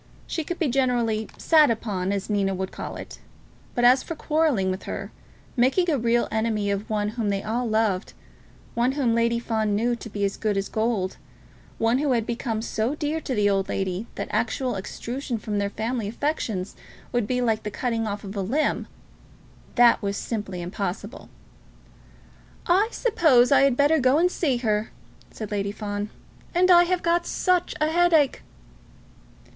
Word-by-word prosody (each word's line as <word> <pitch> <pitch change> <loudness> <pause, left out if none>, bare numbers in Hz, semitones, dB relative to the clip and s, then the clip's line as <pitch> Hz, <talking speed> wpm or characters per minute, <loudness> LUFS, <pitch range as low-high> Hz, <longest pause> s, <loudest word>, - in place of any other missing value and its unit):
She 320 - -3
could 350 +3 -4
be 330 - +1
generally 240 -4 +1
"sat 310 -4 +5
upon," 200 -5 -1
as 200 -1 -2
Nina 195 -2 0
would 190 0 -4
call - - -6
it. - - -9 0.6
But 240 - 0
as 255 +2 +6
for 330 - -6
quarrelling 300 -12 +1
with 185 - -5
her, - - -5 0.4
making 270 +8 +3
a 290 - +2
real 235 +1 +2
enemy 220 -2 0
of 200 +2 -3
one 210 -1 0
whom 220 -1 -2
they 195 -1 -1
all 235 +2 -1
loved, 215 -3 0 0.6
one 240 +3 +1
whom 265 -5 +1
Lady 235 0 +2
Fawn 220 -3 -1
knew 240 +3 +1
to 235 - -9
be 205 -1 -1
"as 195 - -2
good 210 -2 0
as 195 - -2
gold," 220 -4 -1 0.6
one 230 +3 +2
who 285 -2 +1
had 230 -3 0
become 230 -2 -3
so 230 +4 -1
dear 310 +1 -2
to 260 - -3
the 205 -1 +3
old 195 -1 +1
lady 190 +3 -2
that - - -4
actual 255 -2 0
extrusion 240 +6 -4
from 210 -1 -3
their 200 0 0
family 225 +1 -3
affections 220 -6 -2 0.4
would 240 -4 0
be 250 +1 0
like 225 -3 +1
the 210 - -4
cutting 225 0 -2
off 205 0 -4
of 200 +1 -7
a 200 - -1
limb, 265 +11 0 0.9
that 240 -1 +6
was 200 -1 -2
simply 195 -6 -4
impossible. 195 +4 -5 1.4
"I 380 +5 +4
suppose 310 - +3
I 275 - +6
had 275 -3 +3
better 295 +3 +4
go 260 +2 +4
and 355 +3 +3
see 280 -9 0
her," 215 -3 0 0.4
said 215 -2 -7
Lady 200 -1 -1
Fawn, 205 0 -4 0.5
"and 365 +1 +5
I 350 0 +8
have 360 0 -1
got 340 +1 +1
such 365 -2 +1
a 305 +1 +1
headache." 330 -4 +3
230 Hz, 175 wpm, -25 LUFS, 205-275 Hz, 1.4 s, I